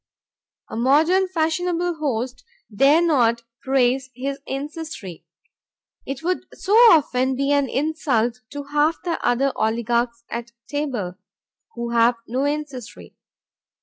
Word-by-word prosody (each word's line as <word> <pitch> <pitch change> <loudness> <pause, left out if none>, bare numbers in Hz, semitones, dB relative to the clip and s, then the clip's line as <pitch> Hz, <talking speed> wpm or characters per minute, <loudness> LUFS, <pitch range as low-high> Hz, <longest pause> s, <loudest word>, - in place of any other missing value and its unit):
A - - -8
modern 315 +11 +3
fashionable 350 +1 0
host 250 -3 -2 0.3
dare 285 +8 +5
not 235 -7 +2 0.2
praise 260 0 +1
his 275 +2 -4
ancestry; 280 - -6 0.8
it 275 +3 -5
would 365 +2 -1
so 400 - -2
often 295 - +5
be 275 +2 0
an 285 -2 +2
insult 260 -5 0
to 285 0 -6
half 295 +3 +1
the 345 -2 -3
other 270 +3 +2
oligarchs 235 +1 0
at 235 0 -5
table, 245 -11 -3 0.6
who 235 0 -4
have 235 +1 +4
no 255 +4 -1
ancestry. 285 -5 -5
275 Hz, 115 wpm, -22 LUFS, 240-310 Hz, 0.8 s, dare